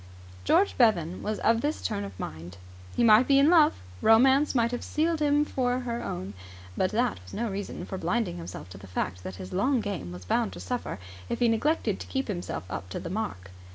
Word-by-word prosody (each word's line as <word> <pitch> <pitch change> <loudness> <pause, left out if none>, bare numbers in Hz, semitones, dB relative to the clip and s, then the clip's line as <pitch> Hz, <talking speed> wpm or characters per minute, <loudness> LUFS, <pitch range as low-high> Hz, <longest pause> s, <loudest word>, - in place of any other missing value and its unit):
George 400 - +3
Bevan 185 -7 +3
was 215 0 -2
of 225 0 +3
this 295 +2 -1
turn 100 - -2
of 100 -1 -9
mind. 85 +3 -7 0.4
He - - +2
might 225 +2 +6
be 275 - +5
in 285 +4 +5
love; 315 -4 +5 0.2
romance 265 +6 +5
might 235 -1 +2
have 245 - -3
sealed 325 +1 0
him 295 0 +3
for 255 -3 0
her 240 -1 -3
own; 95 +3 -5 0.4
but 185 - +1
that 235 - 0
was 90 - -11
no 230 -1 -2
reason 200 +1 -5
for 190 - -5
blinding 180 0 -1
himself 165 - -8
to 95 0 -10
the 95 - -12
fact 90 0 -3
that 95 - -6
his 95 0 -8
long 255 +7 +2
game 200 - -4
was 90 +1 -9
bound 230 - 0
to - - -9
suffer 245 - -4 0.3
if - - -1
he 240 - +3
neglected 225 - +1
to - - -8
keep 265 -3 -2
himself 175 - -4
up 95 -1 -6
to - - -4
the 170 - -6
mark. 95 - -4
220 Hz, 220 wpm, -28 LUFS, -, 0.4 s, might